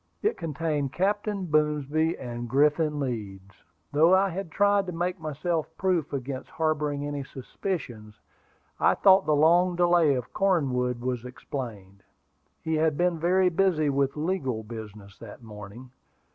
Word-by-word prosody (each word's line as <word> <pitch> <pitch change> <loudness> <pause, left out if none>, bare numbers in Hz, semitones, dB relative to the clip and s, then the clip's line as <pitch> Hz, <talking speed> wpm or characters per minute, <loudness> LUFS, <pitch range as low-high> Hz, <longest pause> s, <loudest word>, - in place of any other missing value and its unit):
It 425 - +2
contained 150 -4 -2
Captain 205 +1 -1
Boomsby 150 0 +1
and 120 -1 -6
Griffin 150 +3 +2
Leeds. 100 -7 -5 0.4
Though 160 +5 +5
I 195 +1 +3
had 190 0 -5
tried 200 +2 +2
to - - -3
make 175 +2 -2
myself 155 +1 -2
proof 180 -6 0
against 135 -1 -5
harboring 150 -3 -1
any 145 -1 -4
suspicions, 125 - -6 0.6
I - - +4
thought 190 0 +5
the 150 - +3
long 175 +4 +4
delay 175 -4 +4
of 125 -2 -5
Cornwood 130 -10 +1
was 125 -1 -2
explained. 115 -6 -7 0.6
He 160 - -2
had 155 -1 +1
been 175 -2 +1
very 180 +3 +3
busy 165 -4 +2
with 140 +1 0
legal 150 -9 -2
business 105 -3 -10
that 115 +1 -11
morning. 110 +3 -11
150 Hz, 140 wpm, -27 LUFS, 125-175 Hz, 0.6 s, Though